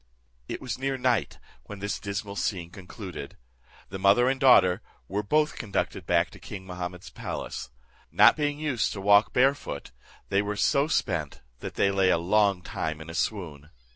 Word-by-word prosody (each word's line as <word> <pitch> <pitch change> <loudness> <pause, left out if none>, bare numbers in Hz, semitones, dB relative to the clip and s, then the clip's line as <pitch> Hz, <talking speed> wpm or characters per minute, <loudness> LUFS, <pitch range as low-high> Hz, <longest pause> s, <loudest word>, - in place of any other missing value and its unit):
It - - -4
was 125 -2 -4
near 135 0 -1
night 125 -3 0 0.3
when 105 - -8
this 100 +1 -3
dismal 100 0 -4
scene 90 -3 -2
concluded. 95 -5 -9 0.5
The 95 - -6
mother 100 +6 +5
and 135 0 -1
daughter 100 -7 +6 0.3
were 100 +2 -1
both 150 +9 +1
conducted 105 -4 -3
back - - +2
to - - -13
king 95 -1 -8
Mahummud's 90 0 -6
palace. - - -6 0.4
Not - - +7
being 145 -1 -1
used 140 -7 -1
to 100 - -6
walk 100 +2 +5
bare 135 +2 +4
foot, 70 - -8 0.4
they 100 +1 +3
were 105 0 -3
so 140 +7 +2
spent, 90 - -1 0.2
that - - -7
they 100 - +2
lay 95 -1 +3
a - - +4
long 100 +1 +2
time 80 -2 -4
in 80 +1 -8
a - - -9
swoon. 80 -7 -3
100 Hz, 175 wpm, -27 LUFS, 90-120 Hz, 0.5 s, Not